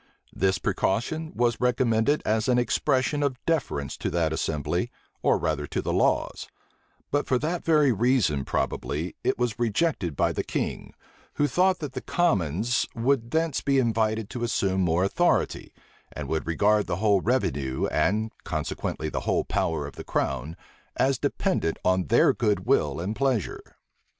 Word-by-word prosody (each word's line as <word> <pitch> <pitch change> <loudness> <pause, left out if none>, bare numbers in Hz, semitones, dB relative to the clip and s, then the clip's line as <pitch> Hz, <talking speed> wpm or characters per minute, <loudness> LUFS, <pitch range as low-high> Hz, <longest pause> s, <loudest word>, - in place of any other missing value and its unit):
This 95 0 +1
precaution 155 - -1
was 120 -1 +1
recommended 125 +2 +2
as 110 +1 +1
an 125 -1 +3
expression 130 +3 +1
of 140 -3 0
deference 125 - -1
to - - -2
that 80 -1 0
assembly, 75 -2 -1 0.3
or - - +3
rather 75 -2 -2
to - - -3
the - - -2
laws: - - +1 0.6
but 145 +1 0
for 130 - +2
that 165 +6 -2
very 150 -4 +4
reason, 110 - +2
probably, 80 +5 -2
it - - +1
was 120 -2 -1
rejected 115 - 0
by - - +2
the - - -2
king; - - -4 0.4
who 145 - +2
thought 185 +7 +2
that 150 -4 -4
the - - -4
commons 110 - +1
would 120 0 +1
thence 160 +1 0
be 140 -1 +2
invited 110 -3 +1
to 120 - -4
assume 95 -5 0
more 90 0 +2
authority, 175 - +1 0.4
and - - -6
would 80 -1 -2
regard 105 +5 +2
the - - -1
whole 100 0 +2
revenue, 70 - 0
and 110 +3 +1
consequently 80 - -3
the - - -2
whole - - +2
power 80 -3 -1
of 70 - -9
the - - -6
crown, 70 +4 -2 0.4
as 135 -1 +2
dependent 80 - 0
on 95 0 +2
their 115 - +5
good 105 -4 0
will 75 +1 +2
and 95 +6 -3
pleasure. 130 -6 0
110 Hz, 160 wpm, -26 LUFS, 85-130 Hz, 0.6 s, their